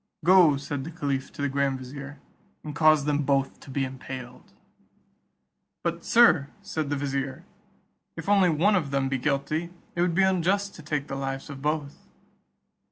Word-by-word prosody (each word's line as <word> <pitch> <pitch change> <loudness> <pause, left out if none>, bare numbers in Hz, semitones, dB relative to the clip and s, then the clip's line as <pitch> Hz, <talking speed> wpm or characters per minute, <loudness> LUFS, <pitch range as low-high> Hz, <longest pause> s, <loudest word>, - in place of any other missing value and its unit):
"Go," 175 -5 +6
said 140 -1 -4
the 155 - -6
caliph 140 -5 -3
to 145 - -5
the - - +2
grand 140 -1 0
vizier, 140 +2 -9 0.4
"and 150 - -6
cause 155 -2 +5
them 150 0 +1
both 135 -1 0
to - - -14
be 135 0 -1
impaled." 130 -1 -9 1.3
"But, 170 0 -2
Sir," 230 - +5 0.2
said 160 -7 -3
the 145 - 0
vizier, 135 -1 -3 0.7
"if 165 - -7
only 200 -3 +5
one 175 +7 +3
of 160 -6 0
them 135 -1 0
be 135 -1 -1
guilty, 150 +5 -1 0.3
it 175 - 0
would 175 -1 +1
be 190 - +4
unjust 190 +2 +1
to - - -11
take 150 -2 -2
the - - -7
lives 135 +2 -4
of 135 -1 -9
both." 150 - -3
145 Hz, 170 wpm, -26 LUFS, 135-170 Hz, 1.3 s, Go